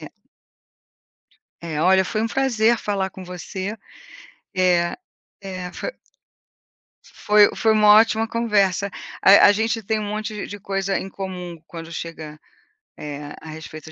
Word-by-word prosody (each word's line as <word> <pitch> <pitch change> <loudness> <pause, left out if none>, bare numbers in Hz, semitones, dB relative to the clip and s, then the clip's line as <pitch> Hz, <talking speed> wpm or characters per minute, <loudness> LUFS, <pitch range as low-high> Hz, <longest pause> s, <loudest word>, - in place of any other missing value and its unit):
É. - - -9 1.5
É, 160 -3 -4
olha 190 +2 +4
foi 215 +3 -2
um 225 - +1
prazer 235 -3 +2
falar 195 -2 -2
com 185 0 -10
você. 185 +4 -6 0.8
É, 180 -2 +2 0.5
é, 185 -2 -6
foi - - -5 1.1
foi 210 0 +4
foi 220 - +3
uma 215 -1 +4
ótima 225 0 +1
conversa. 200 -4 +1 0.3
A 195 +1 +8
a - - +6
gente 225 +2 -1
tem 220 +2 -1
um 210 - -4
monte 215 0 -4
de 205 - -8
coisa 195 -1 -2
em 190 - -6
comum 180 -3 -6
quando 165 0 -9
chega 160 -2 -7 0.6
é, 145 -1 -7
a 160 - -10
respeito 155 0 -9
195 Hz, 140 wpm, -22 LUFS, 175-215 Hz, 1.5 s, A